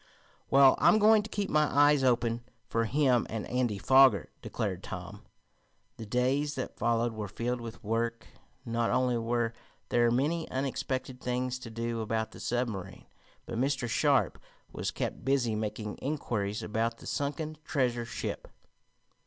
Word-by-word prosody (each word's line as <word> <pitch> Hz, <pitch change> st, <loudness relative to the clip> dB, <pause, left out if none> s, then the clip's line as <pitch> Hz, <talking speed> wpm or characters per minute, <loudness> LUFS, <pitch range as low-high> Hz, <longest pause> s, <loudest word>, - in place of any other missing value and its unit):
"Well, 135 Hz, -1 st, +7 dB
I'm 215 Hz, -, +6 dB
going 215 Hz, 0 st, +6 dB
to 210 Hz, -, -9 dB
keep 200 Hz, -1 st, -2 dB
my 150 Hz, -2 st, +3 dB
eyes 145 Hz, 0 st, +4 dB
open 120 Hz, -2 st, +2 dB, 0.3 s
for 115 Hz, -1 st, 0 dB
him 130 Hz, -1 st, +2 dB
and 110 Hz, -1 st, -4 dB
Andy 125 Hz, -4 st, 0 dB
Foger," 130 Hz, +5 st, +5 dB
declared 95 Hz, -4 st, -3 dB
Tom. 95 Hz, +2 st, -7 dB, 0.8 s
The 110 Hz, -3 st, -8 dB
days 135 Hz, +5 st, +1 dB
that 130 Hz, -, -4 dB
followed 115 Hz, 0 st, +1 dB
were 110 Hz, -1 st, -4 dB
filled 120 Hz, +4 st, -3 dB
with 115 Hz, -1 st, -8 dB
work. 115 Hz, +2 st, -1 dB, 0.4 s
Not 115 Hz, -1 st, 0 dB
only 125 Hz, -1 st, +2 dB
were 115 Hz, 0 st, 0 dB, 0.4 s
there 120 Hz, -1 st, +3 dB
many 150 Hz, +7 st, 0 dB
unexpected 130 Hz, -1 st, -3 dB
things 125 Hz, 0 st, -2 dB
to 120 Hz, -, -8 dB
do 115 Hz, 0 st, -3 dB
about 110 Hz, 0 st, -2 dB
the -, -, -12 dB
submarine, 105 Hz, -7 st, -3 dB, 0.4 s
but 115 Hz, -1 st, -4 dB
Mr. 135 Hz, -1 st, 0 dB
Sharp 115 Hz, -, +2 dB, 0.3 s
was -, -, -3 dB
kept -, -, -4 dB
busy 135 Hz, -4 st, +1 dB
making 105 Hz, 0 st, -4 dB
inquiries 110 Hz, -8 st, -2 dB
about 115 Hz, +2 st, -1 dB
the -, -, -13 dB
sunken 150 Hz, +2 st, -3 dB
treasure 125 Hz, -6 st, 0 dB
ship. -, -, -5 dB
120 Hz, 150 wpm, -30 LUFS, 115-135 Hz, 0.8 s, Well